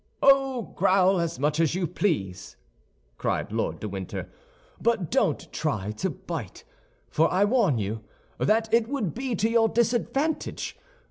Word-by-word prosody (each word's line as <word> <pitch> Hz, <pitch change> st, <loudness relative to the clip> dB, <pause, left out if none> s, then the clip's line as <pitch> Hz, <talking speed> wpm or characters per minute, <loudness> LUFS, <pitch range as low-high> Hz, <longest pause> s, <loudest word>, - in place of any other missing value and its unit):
"Oh, 270 Hz, -5 st, +3 dB
growl 190 Hz, 0 st, +4 dB
as 165 Hz, -4 st, -2 dB
much 150 Hz, +3 st, 0 dB
as 165 Hz, 0 st, +2 dB
you 185 Hz, -1 st, 0 dB
please," 145 Hz, -, -2 dB, 0.6 s
cried -, -, -1 dB
Lord -, -, -1 dB
de 110 Hz, -, -4 dB
Winter, 95 Hz, -2 st, -5 dB, 0.5 s
"but 220 Hz, -8 st, +1 dB
don't -, -, 0 dB
try 100 Hz, +2 st, -1 dB
to 105 Hz, 0 st, -2 dB
bite, -, -, -6 dB, 0.5 s
for 160 Hz, +1 st, +3 dB
I 190 Hz, +3 st, +4 dB
warn 205 Hz, -, +3 dB
you 110 Hz, +1 st, -3 dB, 0.4 s
that 225 Hz, +1 st, +2 dB
it 230 Hz, -1 st, +4 dB
would 245 Hz, -, -2 dB
be 255 Hz, -1 st, -2 dB
to 215 Hz, -, +1 dB
your 225 Hz, -1 st, +3 dB
disadvantage. 250 Hz, +7 st, 0 dB
195 Hz, 145 wpm, -26 LUFS, 150-235 Hz, 0.6 s, growl